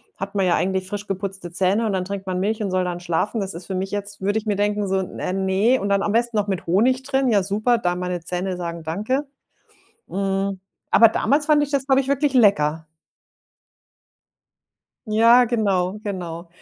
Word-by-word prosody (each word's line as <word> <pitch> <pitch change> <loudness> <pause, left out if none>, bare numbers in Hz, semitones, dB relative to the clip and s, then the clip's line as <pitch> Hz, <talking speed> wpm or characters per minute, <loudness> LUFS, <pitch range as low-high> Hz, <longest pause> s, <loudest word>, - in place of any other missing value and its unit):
hat 195 +1 -6
man 195 -1 +2
ja 180 - +3
eigentlich 190 0 -1
frisch 205 +1 -5
geputzte 195 -2 -4
Zähne, 195 +5 +1
und 210 - -1
dann 185 -1 -1
trinkt 195 0 -6
man 185 -1 -2
Milch 215 +3 -1
und 205 - -1
soll 185 0 0
dann 175 -1 -3
schlafen. 175 +6 -1
Das 195 -2 -4
ist 175 - -8
für 195 - -5
mich 190 +1 -2
jetzt 205 0 -5
würde 205 +3 0
ich 220 - -3
mir 210 -2 0
denken 205 0 0
so: 190 0 +1
„Äh, 185 -1 -4
ne”, 195 +6 +2
und 200 - -2
dann 200 0 +2
am 205 - 0
besten 235 0 +1
noch 205 -1 0
mit 190 -4 -3
Honig 245 +9 +2
drin, 270 -1 0
ja 205 -4 +3
super, 215 +5 +1
da 180 -4 0
meine 180 0 -3
Zähne 180 +1 -3
sagen: 170 -2 -5
„Danke”. 215 - -2 0.8
Mhm. 195 0 -2 0.3
Aber 230 - +8
damals 280 +7 +1
fand 300 -1 +4
ich 290 - -5
das, 275 -2 -1
glaube 270 0 +4
ich, 265 - -8
wirklich 280 0 +1
lecker. 160 -9 +3 2.2
Ja, 230 +3 +6
genau, 205 -5 0
genau. 175 -4 -5
200 Hz, 200 wpm, -22 LUFS, 185-225 Hz, 2.2 s, Aber